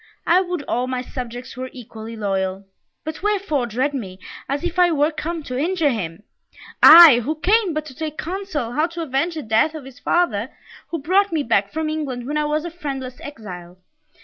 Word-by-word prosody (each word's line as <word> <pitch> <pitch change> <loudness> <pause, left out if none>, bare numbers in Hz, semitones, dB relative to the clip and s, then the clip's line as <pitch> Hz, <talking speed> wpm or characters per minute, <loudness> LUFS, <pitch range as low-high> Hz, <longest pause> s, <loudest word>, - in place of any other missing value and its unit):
I 355 +2 +5
would 355 -4 -3
all 250 -1 -1
my 255 -1 -2
subjects 245 -1 -7
were 255 0 -5
equally 225 -2 -9
loyal! 195 -2 -2 0.4
But 315 0 -6
wherefore 390 -11 0
dread 255 +6 -1
me, 195 -9 -5 0.3
as 280 +3 -2
if 355 +1 -2
I 355 -1 +6
were 300 -1 +2
come 325 +1 -4
to 255 - -6
injure 325 -1 +1
him? 175 -5 -5 0.6
I, 320 -7 +10
who 285 +7 -2
came 385 +1 +2
but 310 0 -2
to 285 - -10
take 310 +1 -5
counsel 345 -8 -4
how 305 +6 +1
to 335 0 -5
avenge 310 +4 -1
the 310 - -4
death 225 +8 +2
of 300 -4 -8
his 270 -2 -13
father, 265 -10 +1 0.4
who 335 - -3
brought 375 +7 +2
me 315 -3 0
back 200 -4 +1
from 320 0 -2
England 285 -6 -3
when 295 +3 -3
I 300 - +1
was 305 +2 -1
a 345 - -5
friendless 270 -6 -6
exile. 180 -10 -9
290 Hz, 200 wpm, -21 LUFS, 240-330 Hz, 0.6 s, I